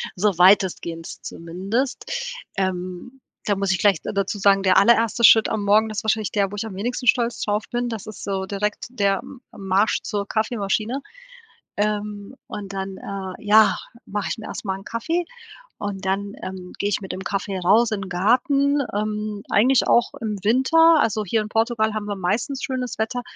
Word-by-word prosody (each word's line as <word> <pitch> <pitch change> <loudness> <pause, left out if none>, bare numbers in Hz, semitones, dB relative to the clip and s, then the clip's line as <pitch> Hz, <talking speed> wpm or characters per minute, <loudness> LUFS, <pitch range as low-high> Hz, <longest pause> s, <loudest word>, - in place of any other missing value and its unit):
so 195 -1 +1
weitestgehend 180 -3 +2
zumindest. 195 +10 -3 0.5
Ähm, 185 +6 -3 0.3
da 205 - +1
muss 195 -1 0
ich 185 - 0
gleich 200 -5 +4
da - - -4
dazu 200 +1 -1
sagen, 195 0 +4
der 185 -1 +4
allererste 230 +2 +4
Schritt 220 -1 +7
am 215 -2 -2
Morgen, 215 +2 +4
das 215 +1 -4
wahrscheinlich 220 -1 0
der, 200 -2 0
wo - - -6
ich 205 +2 -3
am 210 -4 -7
wenigsten 245 +5 -3
stolz 235 0 +2
drauf 210 +1 -1
bin. 240 0 -2
Das 220 -3 -6
ist 215 - -9
so 190 -1 -2
direkt 210 +1 -3
der 200 -5 +1
M 260 - -12
Marsch 195 +2 +1
zur 205 -2 -2
Kaffeemaschine, 220 +3 -1 0.8
ähm, 210 +1 -2
und 200 -1 -7
dann, 195 0 -5
äh 195 -1 -7
ja, 215 +1 +5 0.3
mache 205 0 -3
ich - - -3
mir 220 - -9
erst - - -7
mal 190 -1 -2
'n 195 - -12
Kaffee 325 - -2 0.5
und 200 -1 -5
dann, 200 +1 -1
ähm, 185 -1 -7
gehe 200 - -1
ich 205 - 0
mit 190 -2 -6
dem 190 - -6
Kaffee 195 0 -3
raus 215 +6 +4
in 205 - -2
den 190 - -7
Garten, 275 - +2
ähm, 210 0 -3
eigentlich 250 +5 +4
auch 235 - +3
im 215 -3 -3
Winter. 315 +9 +5
Also, 215 -4 +1
hier 220 +4 0
in 210 - -5
Portugal 225 -1 +1
haben 215 -1 -3
wir 205 -1 -4
meistens 220 +9 -1
schönes 255 -3 -3
Wetter. 225 +3 -1
210 Hz, 190 wpm, -22 LUFS, 195-230 Hz, 0.8 s, Schritt